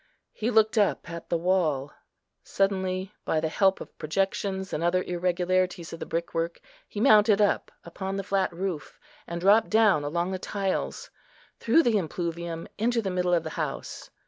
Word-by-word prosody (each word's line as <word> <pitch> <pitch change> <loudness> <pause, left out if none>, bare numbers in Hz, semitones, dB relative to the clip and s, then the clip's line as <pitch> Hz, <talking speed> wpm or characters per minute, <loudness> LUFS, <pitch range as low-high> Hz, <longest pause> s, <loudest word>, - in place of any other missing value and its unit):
He 225 - -2
looked 220 -1 +3
up 205 - +1
at 170 0 -8
the 170 - +1
wall. 165 -6 0 0.5
Suddenly, 190 0 -1
by 160 - 0
the 160 0 -1
help 190 +3 +2
of - - -10
projections, 190 +3 -2
and 155 - -1
other 180 +2 +2
irregularities 180 0 -1
of 165 - -7
the - - -6
brickwork, 165 0 -2 0.3
he 205 - -6
mounted 215 -3 +5
up 205 -1 +2
upon 190 +3 -5
the 195 - -3
flat 195 -1 0
roof, 175 -3 -5 0.3
and 170 0 -4
dropped 200 +5 +4
down 215 -8 +4
along 170 +5 -1
the 190 - -3
tiles, 195 0 -3 0.5
through 295 +9 +4
the 225 -4 +3
impluvium 170 -1 -4
into 235 +2 +1
the 190 - -2
middle 180 -1 +1
of 165 - 0
the 160 - -5
house. 145 -3 -5
185 Hz, 170 wpm, -27 LUFS, 170-200 Hz, 0.5 s, mounted